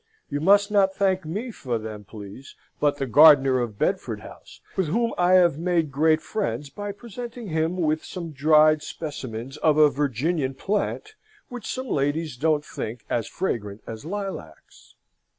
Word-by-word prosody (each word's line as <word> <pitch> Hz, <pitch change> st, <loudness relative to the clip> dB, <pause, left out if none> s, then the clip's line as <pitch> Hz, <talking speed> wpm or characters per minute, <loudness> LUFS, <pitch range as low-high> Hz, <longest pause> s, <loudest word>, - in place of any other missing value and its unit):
You 145 Hz, +1 st, -2 dB
must 200 Hz, +4 st, +4 dB
not 195 Hz, -2 st, +3 dB
thank 190 Hz, -3 st, +1 dB
me 210 Hz, +10 st, -4 dB
for 125 Hz, -, -3 dB
them, 110 Hz, -2 st, -7 dB
please, 105 Hz, +6 st, -11 dB, 0.2 s
but 145 Hz, -1 st, +2 dB
the 135 Hz, -, -2 dB
gardener 135 Hz, -1 st, +6 dB
of 115 Hz, -4 st, -3 dB
Bedford -, -, -1 dB
House, -, -, -13 dB, 0.2 s
with 190 Hz, -4 st, 0 dB
whom 230 Hz, +8 st, 0 dB
I 180 Hz, +1 st, +3 dB
have 175 Hz, -5 st, +5 dB
made 170 Hz, -3 st, 0 dB
great 155 Hz, +3 st, +2 dB
friends 140 Hz, -, -3 dB
by 205 Hz, +6 st, -5 dB
presenting 235 Hz, +1 st, -8 dB
him 160 Hz, +2 st, 0 dB
with 155 Hz, -2 st, 0 dB
some 170 Hz, -3 st, -7 dB
dried 155 Hz, +1 st, +4 dB
specimens 135 Hz, -5 st, -6 dB
of 155 Hz, -1 st, +2 dB
a 150 Hz, -1 st, +6 dB
Virginian 140 Hz, +1 st, -1 dB
plant 210 Hz, -, -2 dB, 0.4 s
which 245 Hz, -4 st, -6 dB
some 260 Hz, 0 st, -4 dB
ladies 145 Hz, -, -1 dB
don't 150 Hz, +2 st, +1 dB
think 110 Hz, +1 st, -6 dB
as 115 Hz, -3 st, 0 dB
fragrant 105 Hz, -, -4 dB
as 110 Hz, -1 st, -8 dB
lilacs. 185 Hz, -, -7 dB
155 Hz, 160 wpm, -24 LUFS, 135-190 Hz, 0.4 s, gardener